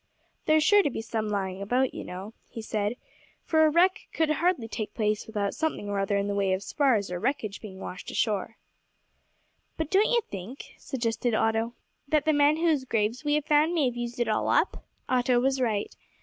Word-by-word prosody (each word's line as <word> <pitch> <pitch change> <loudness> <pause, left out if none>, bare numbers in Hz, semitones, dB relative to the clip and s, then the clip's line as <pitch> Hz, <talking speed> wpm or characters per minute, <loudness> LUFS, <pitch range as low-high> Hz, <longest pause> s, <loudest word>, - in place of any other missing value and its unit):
"There's 310 0 +5
sure 410 +5 +6
to 330 - 0
be 225 - -5
some 220 -1 -2
lying 195 -2 -2
about, 250 +6 +1
you - - -6
know," 190 +4 -8 0.2
he - - -8
said, 215 +1 -1 0.5
"for 315 -1 +4
a 310 - +5
wreck 355 +4 +2
could 320 -1 +1
hardly 325 -6 +1
take 215 -1 -5
place 210 -2 0
without 205 -3 -2
something 315 -10 -2
or 200 -1 -1
other 195 +1 +1
in 200 - 0
the 205 - -1
way 195 -2 +1
of 190 +1 -2
spars 230 -10 +1
or 175 - -3
wreckage 215 -4 -2
being 195 -4 -9
washed 185 - -7
ashore." 215 0 -1 1.2
"But 320 -1 -3
don't 400 +3 +4
you 475 -1 +3
think," 205 - -9
suggested 235 -2 -1
Otto, 225 +2 0 0.3
"that 300 0 +2
the 310 - +3
men 290 +1 +4
whose 320 -5 +2
graves 230 +1 -1
we 295 0 +2
have 300 -1 0
found 305 +3 +3
may 310 -4 +3
have 245 -1 -1
used 240 0 -5
it 240 - +1
all 215 - 0
up?" - - +1 0.2
Otto 250 -1 +2
was 265 +1 +1
right. 215 -4 -1
240 Hz, 205 wpm, -27 LUFS, 210-295 Hz, 1.2 s, sure